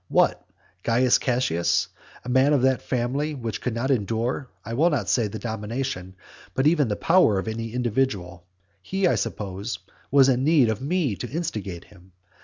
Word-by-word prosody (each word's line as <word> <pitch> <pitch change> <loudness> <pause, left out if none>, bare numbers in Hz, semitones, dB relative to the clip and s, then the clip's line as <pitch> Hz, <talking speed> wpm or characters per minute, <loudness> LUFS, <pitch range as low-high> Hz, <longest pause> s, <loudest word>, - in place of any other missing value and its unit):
What? - - +2 0.4
Caius 120 +2 +3
Cassius, 120 -10 +1 0.4
a - - -5
man 130 +4 +4
of 135 -3 +2
that 130 -1 +3
family 135 +5 -1
which 115 -5 -4
could 125 -3 -2
not 130 +4 0
endure, 120 +3 -1 0.2
I 115 - -5
will 155 +8 +3
not 130 - -1
say 115 -4 +2
the 105 - -6
domination, 110 -3 -4 0.4
but 130 - +1
even 155 -3 +4
the 105 - -1
power 165 - +4
of 95 - -3
any 115 0 -4
individual, 105 -8 -1 0.3
he, 195 0 -1
I - - +4
suppose, 100 +1 -3 0.3
was 135 -1 +6
in 130 -1 +2
need 145 -5 +4
of 110 +1 -2
me 145 - 0
to 120 - -5
instigate 105 - -4
him? 95 -2 -20
120 Hz, 175 wpm, -24 LUFS, 105-135 Hz, 0.4 s, was